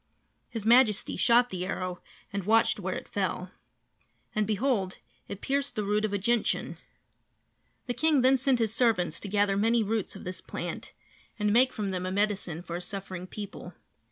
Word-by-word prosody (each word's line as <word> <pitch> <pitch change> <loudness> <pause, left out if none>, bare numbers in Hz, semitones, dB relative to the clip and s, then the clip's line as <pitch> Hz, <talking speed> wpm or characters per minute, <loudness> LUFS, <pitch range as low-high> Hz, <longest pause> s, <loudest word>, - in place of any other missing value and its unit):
His 225 -3 -5
Majesty 230 -3 +4
shot 240 +1 +4
the 180 -1 -3
arrow 185 -1 -3 0.3
and 200 -2 -3
watched 225 +1 +4
where - - -3
it - - -6
fell. - - -2 0.8
And, 215 -1 +1
behold, 215 -4 0 0.3
it 200 - -7
pierced 280 +1 -1
the 215 - -1
root 210 +1 +1
of 215 - -2
a 205 - +1
gentian! 235 +3 0 1.1
The 245 - -2
king 310 0 +3
then 260 +1 +5
sent 260 0 +2
his 225 -2 0
servants 215 -9 +1
to - - -7
gather 205 0 +2
many 225 +3 +3
roots 215 -1 -2
of - - -9
this 185 +1 -5
plant - - -6 0.4
and 210 -1 +1
make 255 +3 +5
from 205 -3 -3
them 185 0 -2
a - - -2
medicine 195 -4 -1
for 170 - -7
his 180 - -6
suffering 190 -2 -6
people. 205 +1 -8
210 Hz, 180 wpm, -28 LUFS, 190-235 Hz, 1.1 s, then